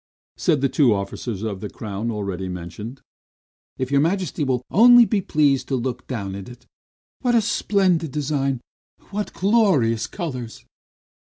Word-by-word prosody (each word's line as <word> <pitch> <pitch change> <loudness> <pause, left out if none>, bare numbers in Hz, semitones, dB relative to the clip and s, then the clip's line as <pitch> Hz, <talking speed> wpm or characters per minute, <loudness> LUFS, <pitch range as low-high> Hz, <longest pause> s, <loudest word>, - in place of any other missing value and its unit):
said 155 -7 +1
the 140 - +3
two 130 -5 +3
officers 100 +2 -4
of 100 -4 -4
the 105 - -5
crown, 105 +1 -5
already 100 -4 -3
mentioned. 90 +8 -7 0.8
"If 130 +1 -3
your 140 0 +4
Majesty 170 -2 0
will 130 -3 0
only 240 +4 +8
be 215 -3 0
pleased 145 -6 +2
to 135 - -1
look 125 +1 -4
at 100 -6 -3
it! 120 +6 -9 0.5
What 245 -2 +1
a - - +6
splendid 185 -7 +1
design! 140 -3 -1 0.5
What 210 +1 -3
glorious 185 - +2
colors!" 130 - -6
130 Hz, 145 wpm, -22 LUFS, 110-170 Hz, 0.8 s, only